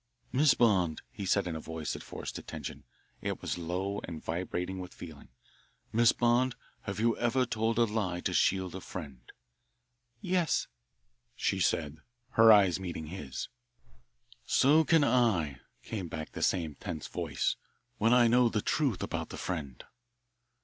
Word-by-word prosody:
"Miss 140 +3 +4
Bond," 95 -9 +2
he 100 - -5
said 100 +1 +2
in 85 -2 -3
a - - -4
voice 80 -1 -4
that - - -6
forced - - -6
attention 70 -1 -7 0.4
it - - -3
was - - -3
low 95 +4 -2
and 80 -2 -6
vibrating 90 +2 -3
with 90 0 -8
feeling 80 -4 -10 0.7
"Miss 115 0 +6
Bond, 120 +1 +2 0.3
have 100 0 -4
you 115 +1 +3
ever 120 +2 +2
told 115 -1 -1
a 120 - +5
lie 105 -6 -1
to - - -1
shield 95 -2 +2
a 95 - -6
friend?" 70 -11 -9 0.9
"Yes," 180 +2 +1 0.7
she - - 0
said, 75 -1 0 0.3
her 115 0 +7
eyes 95 -4 +5
meeting 85 -4 -5
his. 65 -9 -5 1.0
"So 150 +4 +5
can 160 0 +4
I," 105 - +2 0.2
came 100 -6 -4
back 80 -1 -6
the - - -7
same 80 -5 +1
tense 80 +2 -6
voice, - - -1 0.4
"when 115 +2 +3
I 125 -1 +6
know 120 +1 +5
the 105 -2 -1
truth 135 - 0
about - - -3
that - - -7
friend." 75 -9 -4
95 Hz, 155 wpm, -31 LUFS, 85-115 Hz, 1.0 s, her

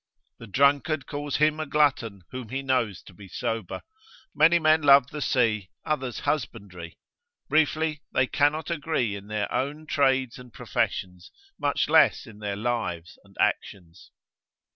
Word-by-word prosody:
The 115 - -10
drunkard 140 +5 +2
calls 145 -1 -4
him 155 +1 +2
a 155 - -3
glutton 130 -9 +1
whom 125 -3 -7
he 135 +3 -4
knows 125 -7 -1
to - - -15
be 100 +2 -13
sober. 115 +3 -4 0.5
Many 165 +3 +5
men 155 -1 +3
love 140 -2 +6
the 150 - -6
sea, 110 -8 +1 0.2
others 135 -6 -2
husbandry; 95 - -4 0.5
briefly, 155 0 +1
they 130 - +2
cannot 150 +4 0
agree 145 -9 -1
in 100 0 -10
their 105 -1 -3
own 145 +4 -2
trades 130 -4 +1
and 125 -1 -13
professions, 90 -4 -3 0.3
much 145 -1 0
less 160 -1 +4
in 110 -4 -14
their 105 -1 -3
lives 105 -7 -3
and - - -22
actions. 85 -2 -2
130 Hz, 145 wpm, -26 LUFS, 105-150 Hz, 0.5 s, love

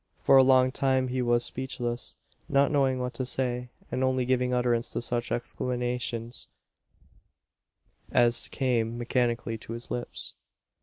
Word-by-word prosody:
For 135 - +6
a 135 - +9
long 130 -1 +5
time 130 -1 +1
he 130 0 -1
was 120 -1 +2
speechless 125 -2 -4 0.3
not 140 0 +3
knowing 135 -3 +2
what 125 0 -3
to 130 - -3
say 125 -1 0 0.2
and 130 +1 -1
only 130 -1 +1
giving 125 0 +1
utterance 120 -1 +1
to - - -1
such 120 -1 -2
exclamations 120 -1 -3 1.6
as 120 -1 +4
came 120 -4 0
mechanically 120 -2 -1
to 115 - -8
his 115 +1 -6
lips. 120 - -4
125 Hz, 140 wpm, -28 LUFS, 120-130 Hz, 1.6 s, a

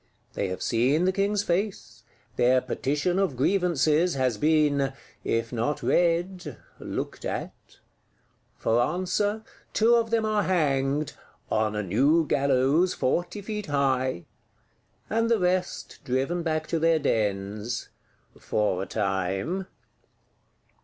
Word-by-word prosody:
They 100 - -1
have 95 0 -4
seen 130 +9 +2
the 185 - +3
King's 200 +1 0
face; 195 +3 -2 0.3
their 125 +1 +4
Petition 150 +8 -1
of 185 -10 0
Grievances 170 0 +2
has 130 -5 0
been, 145 -3 +2 0.3
if 115 +1 -1
not 120 +6 -1
read, 175 +1 0 0.2
looked - - -5
at. - - -3 1.1
For 115 +2 +2
answer, 185 - 0 0.3
two 225 +2 +4
of 230 -1 +3
them 225 -1 +1
are 215 -1 +1
hanged, 145 -5 0 0.4
on 110 -1 +1
a 105 - -1
"new 140 - +3
gallows 140 +5 +2
forty 175 +9 -1
feet 210 0 -5
high;" 130 -8 0 0.8
and 230 +1 0
the 230 - +4
rest 180 -1 -1
driven 135 +6 -1
back 155 -2 -1
to 165 - 0
their 165 0 +3
dens,—for 105 -3 -2
a 95 - -4
time. 95 - -2
150 Hz, 120 wpm, -26 LUFS, 125-180 Hz, 1.1 s, their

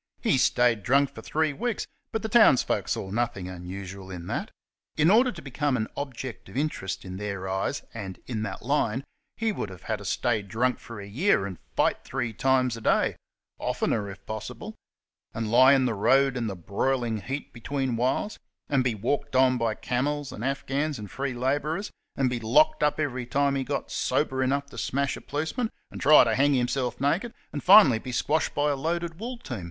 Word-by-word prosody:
He - - +3
stayed 120 -3 +3
drunk 140 +5 +2
for 110 - -9
throe 155 +4 0
weeks, 235 - -2 0.3
but 220 - -2
the - - -1
towns 220 - +6
people - - -1
saw 95 - -2
nothing 110 -4 -1
unusual 95 +1 -7
in 90 -2 -7
that. - - -3 0.5
In 155 +4 +5
order 245 +4 +5
to 170 -4 -10
be 135 - -9
come 145 0 +1
an 110 - -1
object 130 -4 -6
of - - -8
interest 95 -12 -2
in 95 0 -6
their 100 -2 -4
eyes, 95 +8 -2
and 95 -5 -6
in 115 -4 -3
that 110 - -5
line, 130 -2 0 0.3
he 225 -1 +1
would 110 - -4
have 90 -2 -11
had 110 - -2
to 100 - -10
stay 110 +3 0
drunk 115 +6 0
for 115 -3 -9
a 100 - -7
year 110 - +2
and 95 -3 -7 0.2
fight - - +1
three 120 -3 -3
times 130 +1 +2
a 115 - -9
day - - +2 0.4
oftener, 105 -3 -1
if 95 - -11
possible 110 -1 -6 0.6
and 115 -1 -2
lie 130 +3 +7
in 135 -2 +3
the 120 - +1
road 135 +6 +3
in 120 -2 -1
the 100 - -4
broiling 115 +5 -1
heat 135 +6 -5
between 130 +1 -2
whiles, 130 - -1 0.3
and 135 -3 +2
be 125 -3 0
walked 130 +6 -2
on 130 -1 +4
by 115 -2 0
camels 145 +5 -2
and 105 - -7
Afghans 140 +2 -1
and 105 -4 -8
free 135 -1 -3
labourers, 145 +9 -1 0.2
and 135 - +2
be 125 -1 -1
locked 120 +8 +3
up 150 +1 +2
every 130 -5 -2
time 140 +2 +2
he 135 -1 0
got - - -3
sober 130 0 0
enough 140 +2 +1
to 140 - -9
smash 140 +1 0
a - - -9
policeman, 160 +11 -2 0.2
and - - -8
try 150 +2 +8
to 115 - +1
hang 140 +3 +3
him 125 -1 +2
self 125 -1 -2
naked, 185 - 0 0.2
and 145 - -3
be - - -24
finally 135 - +7
squashed 155 +5 0
by 145 0 +2
a - - 0
loaded 165 +3 -2
wool 245 +3 -5
team. 130 - -6
130 Hz, 205 wpm, -27 LUFS, 110-145 Hz, 0.6 s, try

